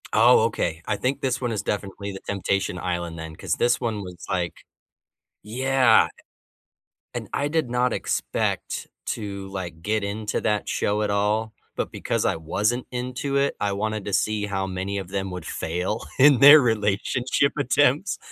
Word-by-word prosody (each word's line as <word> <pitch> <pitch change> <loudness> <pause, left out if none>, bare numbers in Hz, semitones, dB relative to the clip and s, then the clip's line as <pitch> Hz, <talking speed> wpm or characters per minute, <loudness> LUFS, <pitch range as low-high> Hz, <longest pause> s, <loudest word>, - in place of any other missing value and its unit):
Oh, 120 +2 +6
okay. 85 -7 -1
I - - 0
think 130 +2 -1
this 130 -1 -1
one 120 -2 -1
is 105 - -1
definitely 100 0 -4
the 95 - -7
Temptation 100 -1 -1
Island 85 -2 -3
then, 80 0 -7
'cause - - -3
this 120 +1 +2
one 110 -4 -2
was 90 -1 -10
like 90 -2 -1 0.9
Yeah. 130 +1 +4 1.1
And - - -5
I 145 - 0
did 155 -4 0
not 125 0 +1
expect - - -2 0.2
to, 100 -2 -4
like, 90 -4 -6
get 105 +3 0
into 105 +2 -2
that 105 -1 0
show 105 +1 0
at 105 - -1
all, 105 +2 0 0.2
but - - -3
because - - -2
I - - +2
wasn't 105 +10 -1
into 125 +3 -2
it, 140 0 +1
I 105 - 0
wanted 110 0 -2
to 100 - -4
see 105 +1 +1
how 95 -1 -2
many 95 +1 -3
of 95 -3 -5
them 95 0 -3
would 90 0 -6
fail 90 +6 -2 0.2
in 140 -1 +7
their 145 +3 +10
relationship 115 +4 +1
attempts. 145 +4 +2
105 Hz, 165 wpm, -24 LUFS, 95-125 Hz, 1.1 s, their